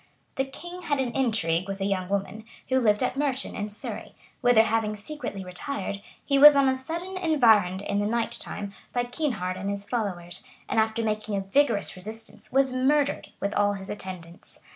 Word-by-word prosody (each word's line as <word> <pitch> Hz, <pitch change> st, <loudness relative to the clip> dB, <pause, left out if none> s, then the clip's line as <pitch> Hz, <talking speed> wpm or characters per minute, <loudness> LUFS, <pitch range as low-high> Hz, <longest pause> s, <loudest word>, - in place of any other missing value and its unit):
The 270 Hz, -, +1 dB
king 350 Hz, +7 st, -9 dB
had 290 Hz, -5 st, 0 dB
an 255 Hz, -3 st, 0 dB
intrigue 200 Hz, -9 st, +1 dB
with 195 Hz, 0 st, -4 dB
a 195 Hz, -, -1 dB
young 190 Hz, -2 st, -1 dB
woman, 200 Hz, +2 st, -2 dB, 0.3 s
who 260 Hz, 0 st, +3 dB
lived 210 Hz, -2 st, +3 dB
at 255 Hz, -, 0 dB
Merton, 275 Hz, -2 st, -1 dB
in 205 Hz, +1 st, -3 dB
Surrey, 205 Hz, -, -7 dB, 0.3 s
whither 245 Hz, -3 st, +6 dB
having 225 Hz, -1 st, 0 dB
secretly 215 Hz, -3 st, -6 dB
retired, 200 Hz, +2 st, -4 dB, 0.2 s
he 275 Hz, -1 st, +3 dB
was 295 Hz, +1 st, +11 dB
on 275 Hz, -1 st, +5 dB
a 260 Hz, -, +3 dB
sudden 335 Hz, +8 st, -5 dB
environed, 220 Hz, -, +4 dB
in 200 Hz, 0 st, -1 dB
the 205 Hz, -, +1 dB
night 235 Hz, +1 st, 0 dB
time, 200 Hz, -1 st, -5 dB, 0.2 s
by 245 Hz, -, +1 dB
Kynehard 240 Hz, -, -2 dB
and 195 Hz, +2 st, -3 dB
his 200 Hz, 0 st, -4 dB
followers, 190 Hz, -7 st, -3 dB, 0.2 s
and 225 Hz, -, +1 dB
after 220 Hz, +1 st, +1 dB
making 215 Hz, -1 st, -1 dB
a -, -, +1 dB
vigorous 205 Hz, +2 st, +1 dB
resistance, 215 Hz, +5 st, -10 dB
was 265 Hz, 0 st, +3 dB
murdered, 280 Hz, +3 st, +2 dB
with 200 Hz, +1 st, -1 dB
all 205 Hz, 0 st, +3 dB
his 195 Hz, -1 st, -6 dB
attendants. 185 Hz, -3 st, -9 dB
220 Hz, 185 wpm, -27 LUFS, 200-265 Hz, 0.3 s, was